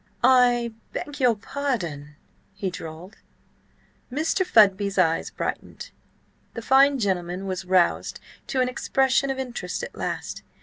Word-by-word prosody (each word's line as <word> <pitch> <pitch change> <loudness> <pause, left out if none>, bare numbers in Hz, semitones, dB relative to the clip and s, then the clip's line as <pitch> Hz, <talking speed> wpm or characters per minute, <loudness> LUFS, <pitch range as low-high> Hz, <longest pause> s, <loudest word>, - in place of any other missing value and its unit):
"I 245 -2 +4 0.2
beg 290 -1 -5
your 245 -3 +4
pardon?" 190 - -4 0.4
he 190 -2 -3
drawled. 165 +3 -9 0.9
Mr. 320 +7 0
Fudby's 200 - +4
eye 165 -3 +3
brightened. - - -5 0.6
The 230 - -5
fine 275 +3 +5
gentleman 185 -4 -2
was 190 -1 -4
roused 180 -1 +1 0.3
to 260 - 0
an 250 - +2
expression 265 +1 +1
of 270 - -2
interest 240 -9 -4
at - - -6
last. - - -4
225 Hz, 125 wpm, -24 LUFS, 185-265 Hz, 0.9 s, fine